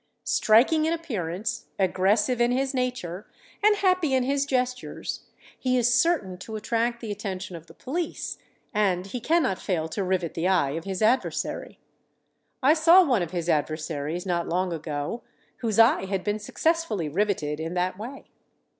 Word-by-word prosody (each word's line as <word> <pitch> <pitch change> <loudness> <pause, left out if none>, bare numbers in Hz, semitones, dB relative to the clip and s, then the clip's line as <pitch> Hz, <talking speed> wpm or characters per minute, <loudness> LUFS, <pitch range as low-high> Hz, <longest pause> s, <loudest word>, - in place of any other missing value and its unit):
Striking 260 +9 +4
in 325 - +1
appearance, 225 - -3
aggressive 205 +6 +2
in 240 - +4
his 265 +2 0
nature, 245 -8 -3 0.3
and 420 0 +5
happy 365 -8 +2
in 260 - +2
his 280 +2 0
gestures, 255 -1 -2 0.3
he 255 -1 +1
is 240 0 +3
certain 240 - +1
to 220 +3 -7
attract 235 +2 -1
the 225 -3 -5
attention 190 -3 -5
of 165 0 -11
the - - -14
police, 325 +5 -4 0.3
and 190 -4 +1
he 220 +6 -5
cannot 260 - +1
fail 165 -4 -1
to 195 +4 -2
rivet 185 -3 -1
the 170 +2 -1
eye 175 -8 +2
of 165 +3 -5
his 195 +1 -2
adversary. 240 +4 0 0.9
I 285 +4 +6
saw 335 +3 +6
one 250 - +2
of 170 - -2
his 170 -1 -3
adversaries, 155 +1 -1
not 175 -2 -1
long 180 +1 0
ago, 155 +6 -4 0.4
whose 225 -3 -2
eye 225 -3 +5
had 190 -1 -2
been 210 0 -1
successfully 320 - 0
riveted 155 -3 -1
in 165 +2 -4
that 180 +1 0
way. 235 +8 -8
210 Hz, 165 wpm, -26 LUFS, 180-255 Hz, 0.9 s, I